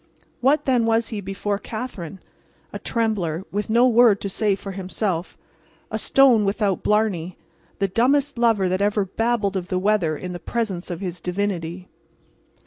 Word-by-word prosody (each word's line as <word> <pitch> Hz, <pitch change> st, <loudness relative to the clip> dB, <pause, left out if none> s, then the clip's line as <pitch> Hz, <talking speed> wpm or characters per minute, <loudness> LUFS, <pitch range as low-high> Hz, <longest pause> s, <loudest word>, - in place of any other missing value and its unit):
What 280 Hz, +4 st, +2 dB
then 245 Hz, -4 st, +2 dB
was 225 Hz, 0 st, +2 dB
he 215 Hz, -3 st, -4 dB
before 200 Hz, +1 st, -3 dB
Katherine? 210 Hz, -6 st, -6 dB, 0.5 s
A -, -, -5 dB
trembler, 195 Hz, -7 st, -1 dB
with 205 Hz, +2 st, -2 dB
no 235 Hz, +3 st, +5 dB
word 235 Hz, -4 st, +5 dB
to 200 Hz, -, -3 dB
say 205 Hz, 0 st, +1 dB
for 195 Hz, 0 st, -8 dB
himself, 185 Hz, -1 st, -3 dB, 0.5 s
a -, -, -1 dB
stone 260 Hz, -6 st, +5 dB
without 200 Hz, -1 st, 0 dB
blarney, 195 Hz, -5 st, 0 dB, 0.4 s
the 195 Hz, -, +1 dB
dumbest 265 Hz, +6 st, +1 dB
lover 225 Hz, -5 st, +3 dB
that 185 Hz, +2 st, 0 dB
ever 205 Hz, 0 st, +1 dB
babbled 215 Hz, 0 st, 0 dB
of 180 Hz, -2 st, -2 dB
the 185 Hz, -, -1 dB
weather 185 Hz, -5 st, +1 dB
in 180 Hz, +3 st, -6 dB
the 175 Hz, -, -6 dB
presence 200 Hz, -7 st, -3 dB
of 175 Hz, 0 st, -5 dB
his 180 Hz, -2 st, -4 dB
divinity. 180 Hz, -2 st, -3 dB
200 Hz, 160 wpm, -23 LUFS, 185-230 Hz, 0.5 s, no